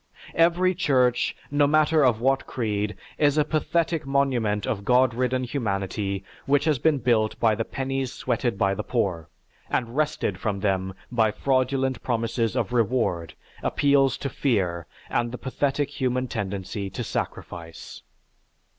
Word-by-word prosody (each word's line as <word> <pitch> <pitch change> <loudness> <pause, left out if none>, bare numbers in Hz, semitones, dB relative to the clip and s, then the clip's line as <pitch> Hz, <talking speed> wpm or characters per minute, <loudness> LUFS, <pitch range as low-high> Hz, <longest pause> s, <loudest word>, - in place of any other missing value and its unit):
Every 175 +2 +3
church, 130 -8 +2 0.2
no 145 0 +4
matter 155 +1 +4
of 120 -4 +3
what 135 +2 +1
creed, 105 -3 -2 0.2
is 145 0 +3
a 150 - +4
pathetic 160 +1 0
monument 130 -7 +1
of 110 -6 -2
God 125 +2 +4
ridden 130 +1 0
humanity 100 -5 -2 0.2
which 145 +1 +3
has 155 -5 +2
been 155 +2 +3
built 115 -4 +1
by 115 -2 +4
the 115 - -1
pennies 135 -1 -3
sweated 120 -4 -1
by 95 0 +2
the - - -3
poor, 95 -10 -1 0.4
and 120 0 -1
wrested 150 -10 0
from 100 -2 -2
them 95 -2 0 0.2
by 115 -3 +3
fraudulent 130 +2 0
promises 115 -2 -1
of - - -1
reward, 110 -8 0 0.3
appeals 140 -2 +3
to 140 - -3
fear, 90 - 0 0.2
and 120 0 -1
the 125 - -5
pathetic 140 +2 -1
human 130 -2 -1
tendency 100 -2 -4
to - - -5
sacrifice. 85 -2 -6
125 Hz, 145 wpm, -25 LUFS, 105-140 Hz, 0.4 s, no